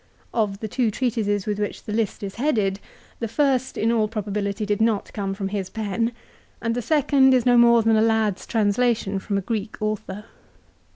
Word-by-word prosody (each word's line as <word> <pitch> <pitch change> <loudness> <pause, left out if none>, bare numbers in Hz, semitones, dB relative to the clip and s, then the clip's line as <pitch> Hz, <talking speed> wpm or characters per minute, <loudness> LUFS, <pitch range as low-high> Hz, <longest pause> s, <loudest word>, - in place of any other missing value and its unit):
Of 210 -3 -1
the 220 - -3
two 235 +2 0
.treatises 210 -4 -1
with 210 -1 -2
which 205 - -3
the 210 - -5
list 215 -2 -1
is 195 -1 -4
headed 210 -9 +1 0.4
the 230 - -2
first 265 +1 0
in 225 +2 +2
all 220 -2 +2
probability 210 -1 -3
did 205 0 -1
not 220 -2 0
come 195 -2 -3
from 195 -1 -3
his 195 -2 -3
pen, 225 +1 -2 0.5
and 230 0 -1
the 245 - -2
second 270 -1 +4
is 250 - +1
no 245 -1 +5
more 235 -1 +6
than 225 0 +3
a 215 - +4
lad's 220 -3 +1
translation 215 -2 +1
from 200 +1 -2
a - - 0
Greek 215 +1 -4
author. 210 -1 -4
215 Hz, 190 wpm, -23 LUFS, 205-235 Hz, 0.5 s, more